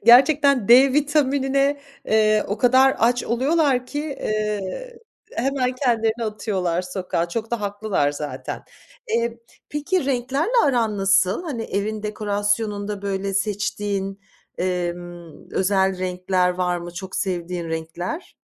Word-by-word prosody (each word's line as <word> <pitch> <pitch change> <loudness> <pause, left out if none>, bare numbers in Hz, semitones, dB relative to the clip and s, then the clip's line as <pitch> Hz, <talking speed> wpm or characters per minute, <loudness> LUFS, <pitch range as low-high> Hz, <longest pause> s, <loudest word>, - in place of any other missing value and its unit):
Gerçekten 275 0 +6
D 255 +3 +7
vitaminine, 280 -1 +2 0.2
eee, 215 -2 +3
o 205 - -2
kadar 260 +2 +5
aç 240 +2 +2
oluyorlar 265 +1 +1
ki, 290 +3 -3
eee, 215 - -3 0.4
hemen 255 0 0
kendilerini 235 -3 0
atıyorlar 190 -5 -1
sokağa. 180 -2 -2
Çok 220 +5 -4
da 235 -2 -1
haklılar 200 -8 0
zaten. 145 -3 -5 0.5
Eee, 235 - 0 0.3
peki, 295 +3 -1
renklerle 270 - 0
aran 230 -7 +1
nasıl? 195 - +3
Hani, 265 -9 -3
evin 210 +1 -3
dekorasyonunda, 205 -1 -1
böyle, 195 -1 -2
seçtiğin, 200 -1 -2 0.4
emm, 175 -2 -4
özel 190 -1 +1
renkler 180 0 0
var 180 -1 -1
mı? 175 0 -8
Çok 190 +2 -6
sevdiğin 175 -2 -2
renkler? 165 - -5
210 Hz, 115 wpm, -22 LUFS, 185-255 Hz, 0.5 s, D